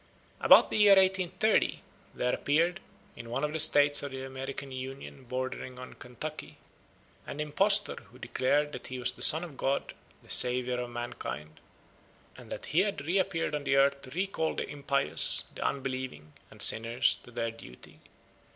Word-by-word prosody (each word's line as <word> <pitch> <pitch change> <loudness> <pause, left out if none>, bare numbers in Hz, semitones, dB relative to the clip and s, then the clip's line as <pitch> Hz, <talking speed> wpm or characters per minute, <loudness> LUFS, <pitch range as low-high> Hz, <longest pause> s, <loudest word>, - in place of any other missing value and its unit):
About - - +6
the - - 0
year 205 -1 +7
1830 190 +2 +1 0.3
there 125 0 -1
appeared, 170 +5 +1 0.4
in 115 0 -10
one 130 +5 -3
of 150 0 -1
the 160 - -2
States 145 -1 +6
of 145 - -5
the 130 -1 -7
American 135 +1 -7
Union 130 +1 -8
bordering 130 0 -5
on 125 0 -9
Kentucky, 135 +5 -8 0.7
an 145 - -7
impostor 150 +7 +2
who - - -18
declared 145 +3 0
that 125 - -8
he 130 - -6
was 125 0 +1
the - - -15
Son 160 +3 +7
of 155 -6 -10
God, 135 +1 -2 0.3
the - - -21
Saviour 125 0 +2
of 125 0 -4
mankind, 80 -10 -7 0.8
and - - -14
that - - -6
he 155 - +1
had 195 -7 -1
reappeared 175 -2 -1
on 145 -2 -4
earth 140 0 +3
to 130 - -11
recall 165 +1 -2
the - - -3
impious, 140 -1 +1
the - - -6
unbelieving, 130 - -4 0.2
and - - -5
sinners 115 +2 +3
to - - -16
their 115 -1 -3
duty. 65 - -14
135 Hz, 165 wpm, -29 LUFS, 125-155 Hz, 0.8 s, year